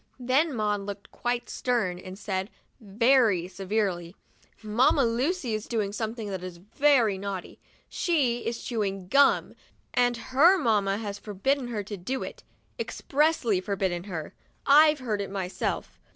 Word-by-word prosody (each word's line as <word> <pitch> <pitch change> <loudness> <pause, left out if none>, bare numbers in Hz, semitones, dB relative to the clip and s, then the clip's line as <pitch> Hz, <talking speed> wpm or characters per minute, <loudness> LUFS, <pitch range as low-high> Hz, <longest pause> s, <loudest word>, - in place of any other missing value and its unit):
Then 265 +4 +1
Maud 210 -2 0
looked 200 0 -8
quite 240 0 -2
stern 215 -8 -1
and 185 +1 -9
said, 190 -1 -3 0.3
very 220 -3 +3
severely, 185 -2 -2 0.3
" - - -33
Mamma 240 +5 +3
Lucy 250 +3 0
is 215 0 -3
doing 210 -4 -1
something 220 0 -4
that 190 -2 -4
is 180 -2 -7
very 225 +1 +2
naughty. 195 -2 -6 0.3
She 275 -9 +1
is 230 0 -4
chewing 195 -6 -3
GUM, 280 +3 +4 0.4
and 245 -1 +2
her 280 +11 +4
mamma 210 - +1
has 205 -2 -5
forbidden 245 +6 -1
her 220 -4 -3
to 205 +1 -7
do 255 +9 -3
it, - - -8 0.4
expressly 275 - +1
forbidden 185 -3 -2
her; 170 -6 -6 0.3
I've 300 +2 +6
heard 215 -5 -2
her 200 - -3
myself." 190 -2 -4
215 Hz, 145 wpm, -27 LUFS, 195-255 Hz, 0.4 s, I've